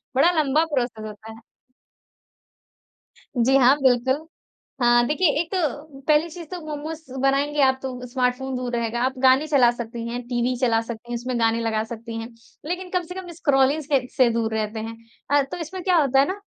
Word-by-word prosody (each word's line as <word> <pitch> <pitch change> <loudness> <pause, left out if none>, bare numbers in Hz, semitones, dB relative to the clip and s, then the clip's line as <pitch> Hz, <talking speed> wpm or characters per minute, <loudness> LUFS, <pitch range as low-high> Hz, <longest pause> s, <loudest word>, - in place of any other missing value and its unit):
बड़ा 330 +7 +5
लंबा 300 +2 +3
प्रोसेस 240 -4 -1
होता 215 +1 -9
है। 225 - -12 2.0
जी, 255 +3 +3
हाँ, 265 +2 +6
बिल्कुल। 260 +4 +2 0.5
हाँ, 240 0 +5
देखिए, 335 +4 +2
एक 340 - -6
तो 295 -5 -3
पहली 305 +2 +3
चीज़ 340 0 -9
तो 360 - -4
मोमोज़ 305 +2 -5 0.2
बनाएँगे 280 +2 +2
आप, 265 -1 +3
तो 250 -1 -5
स्मार्टफ़ोन 255 +1 -1
दूर 250 -1 -3
रहेगा। 235 0 -1
आप 260 - 0
गाने 265 +4 +5
चला 265 -5 +5
सकती 235 -1 -6
हैं, 245 +1 -4
टीवी 245 0 0
चला 230 -3 +3
सकती 235 +1 -8
हैं, - - -1
उसमें 245 0 -3
गाने 225 0 +2
लगा 220 -1 0
सकती 230 0 -8
हैं, 225 +1 -6 0.4
लेकिन 360 +2 -4
कम 365 -1 0
से 360 +2 -9
कम 375 -1 -7
स्क्रॉलिंग 285 -1 +2
से 270 -3 +1
से 255 -2 +5
दूर 225 -1 -1
रहते 220 0 -2
हैं। 225 +1 -6 0.4
अर 280 - +4
तो - - -4
इसमें 350 +3 -6
क्या 365 -2 +3
होता 270 -3 +3
है 275 - +4
ना, 390 +2 -4
260 Hz, 190 wpm, -23 LUFS, 235-300 Hz, 2.0 s, हाँ